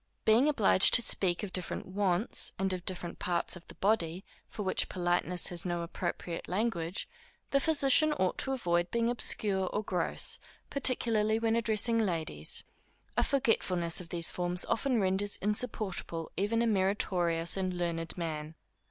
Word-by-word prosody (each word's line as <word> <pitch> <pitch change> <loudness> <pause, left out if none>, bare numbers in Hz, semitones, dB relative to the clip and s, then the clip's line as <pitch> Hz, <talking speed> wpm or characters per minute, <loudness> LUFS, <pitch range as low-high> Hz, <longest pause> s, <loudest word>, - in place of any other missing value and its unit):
Being 235 +7 +5
obliged 210 -8 +5
to 245 - +7
speak 180 -4 +2
of 195 - -6
different 180 -2 -3
wants, 190 +1 +1
and 190 0 +1
of 180 -1 -5
different 175 -2 -5
parts 175 0 -1
of 175 - -13
the - - -12
body, 190 -3 0 0.2
for 210 - -6
which 190 - 0
politeness 175 0 0
has 175 -1 -2
no 175 -1 -2
appropriate 170 0 -5
language, 185 -3 -2 0.4
the 275 - +4
physician 310 +1 +3
ought 185 -10 -1
to 270 - -2
avoid 175 -9 0
being 235 0 0
obscure 200 -5 +1
or 210 - -2
gross, 180 -4 0 0.3
particularly 225 -5 +2
when 225 0 +1
addressing 230 0 +1
ladies. 160 - -3 0.5
A - - +3
forgetfulness 185 - +1
of 170 - -11
these 170 -1 +1
forms 180 0 -2
often 250 0 0
renders 195 +1 0
insupportable 205 -6 -3
even 225 +4 0
a - - +1
meritorious 185 -5 +1
and 185 -2 -2
learned 165 -1 -3
man. 155 -2 -4
190 Hz, 150 wpm, -31 LUFS, 175-225 Hz, 0.5 s, to